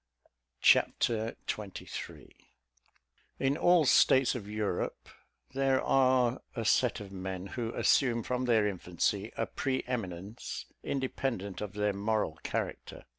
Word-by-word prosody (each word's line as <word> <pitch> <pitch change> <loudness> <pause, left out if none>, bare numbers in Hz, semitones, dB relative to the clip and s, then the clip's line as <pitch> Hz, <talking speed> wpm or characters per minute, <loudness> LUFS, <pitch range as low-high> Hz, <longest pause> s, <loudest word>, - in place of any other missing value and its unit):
Chapter 115 -1 +3
XXIII 105 -3 -6 1.0
In 135 +1 +1
all 175 0 +4
states 130 -1 +5
of 105 -5 -6
Europe, 105 -4 -3 0.4
there 135 -1 +2
are 130 -2 +3
a 115 -2 -3
set 125 +2 +3
of 100 -2 -9
men 95 -1 -5
who 115 +2 -4
assume 120 -4 +3
from 125 +2 -1
their 115 -4 +3
infancy 95 +2 -1
a - - 0
pre 130 -1 -2
eminence 105 -3 -5 0.2
independent 130 -7 -3
of 105 -1 -5
their 105 0 0
moral 100 -5 -1
character. - - -4
115 Hz, 120 wpm, -31 LUFS, 100-130 Hz, 1.0 s, states